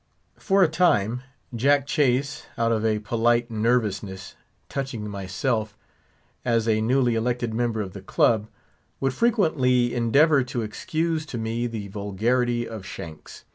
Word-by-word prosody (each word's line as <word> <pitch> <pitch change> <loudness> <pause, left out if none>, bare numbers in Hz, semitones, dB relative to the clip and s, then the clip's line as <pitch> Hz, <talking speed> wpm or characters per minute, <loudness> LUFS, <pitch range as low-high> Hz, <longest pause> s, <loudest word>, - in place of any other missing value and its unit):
For 195 -2 +3
a - - +5
time, 125 - +2 0.3
Jack 140 +4 +3
Chase, 140 -1 0
out 115 0 +1
of 110 -1 0
a 110 -1 +2
polite 120 +2 +1
nervousness 105 -4 -1 0.3
touching 130 -6 -4
myself, 105 +3 -2 0.7
as 115 -1 +1
a 110 -1 +2
newly 125 +1 +2
elected 120 0 -1
member 115 -1 0
of 95 -3 -6
the 100 - -8
club, 110 +2 +2 0.5
would 135 -1 0
frequently 130 - +2
endeavour 140 +5 +4
to 120 -1 -3
excuse 160 +9 -2
to 125 - -5
me 115 +2 -2
the 110 -3 -5
vulgarity 120 +5 0
of 110 -4 -7
Shanks. 80 -4 -9
120 Hz, 135 wpm, -24 LUFS, 110-130 Hz, 0.7 s, a